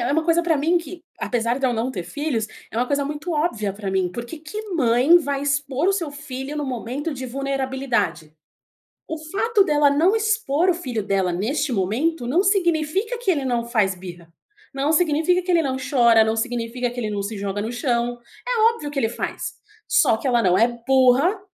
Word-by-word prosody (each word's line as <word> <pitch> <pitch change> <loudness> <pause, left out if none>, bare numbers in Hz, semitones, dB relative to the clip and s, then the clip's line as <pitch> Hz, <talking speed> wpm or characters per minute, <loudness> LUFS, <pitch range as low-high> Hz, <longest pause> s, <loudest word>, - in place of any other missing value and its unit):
é 240 +3 0
uma 320 +2 +1
coisa 335 +1 +3
pra 330 -3 +2
mim 320 +5 +2
que, 335 +1 -10 0.2
apesar 235 +1 -1
de 270 - +1
eu 250 - +1
não 235 +2 -1
ter 190 -8 -4
filhos, 270 - -2 0.2
é - - -8
uma 245 +2 +1
coisa 285 +1 0
muito 300 +4 -4
óbvia 240 - -1
pra 200 0 -5
mim. 190 -1 +1
Por 235 +6 -6
que 325 +7 -9
que 420 +8 -7
mãe 255 +2 +5
vai 285 -4 -2
expor 280 +3 0
o - - +4
seu 345 -6 -2
filho 280 0 -6
num 295 - -2
momento 260 +5 -4
de 260 -1 -6
vulnerabilidade? 260 - -2 0.8
O 320 - -4
fato 400 +7 +1
dela 295 -5 +3
não 325 +9 +3
expor 425 -7 +1
o - - +4
filho 255 - -4
dela 195 -2 0
neste 265 - -1
momento 240 - 0
não 330 +10 +2
significa 385 +3 +1
que 470 -4 -3
ele 285 -5 -1
não 240 -2 0
faz 215 -5 +1
birra, 175 -2 -11 0.4
não 275 +3 0
significa 325 +2 +2
que 365 - -1
ele 340 -2 +4
não 265 -4 -2
chora, 235 -4 +4
não 220 0 0
significa 240 +1 -2
que 245 +1 -7
ele 220 -3 -2
não 205 -1 -2
se 205 +2 -5
joga 200 0 -3
no 220 +3 -3
chão. 240 -1 -1 0.3
É 485 -3 +1
óbvio 300 -11 -6
que 290 - -7
ele 225 - +1
faz, 235 - -4 0.3
só 220 - +3
que 265 - -4
ela 240 -2 +3
não 185 -3 +3
é 230 - +5 0.2
burra 265 - +4
270 Hz, 210 wpm, -22 LUFS, 235-320 Hz, 0.8 s, mãe